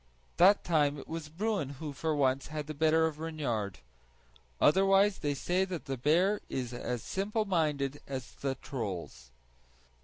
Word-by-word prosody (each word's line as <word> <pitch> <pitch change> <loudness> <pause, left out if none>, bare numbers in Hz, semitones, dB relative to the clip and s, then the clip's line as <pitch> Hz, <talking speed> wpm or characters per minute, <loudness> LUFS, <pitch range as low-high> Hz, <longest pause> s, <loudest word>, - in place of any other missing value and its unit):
That 195 +4 +6
time 150 -4 +2
it - - -9
was 160 -2 -5
Bruin 195 -2 -1
who 150 0 -5
for 155 +2 -1
once 135 -1 +1
had 150 -1 -4
the 155 - -5
better 160 +2 +3
of 155 -2 -3
Reynard; 130 - -2 0.8
otherwise 195 +4 +4
they 145 -2 -1
say 180 +7 +1
the 185 -2 -3 0.2
bear 175 - +2
is 125 -2 -3
as 120 -1 -3
simple 210 +3 -1
minded 150 -7 0
as 130 -3 -5
the 135 -1 -3
trolls. 90 - -6
150 Hz, 150 wpm, -31 LUFS, 135-180 Hz, 0.8 s, That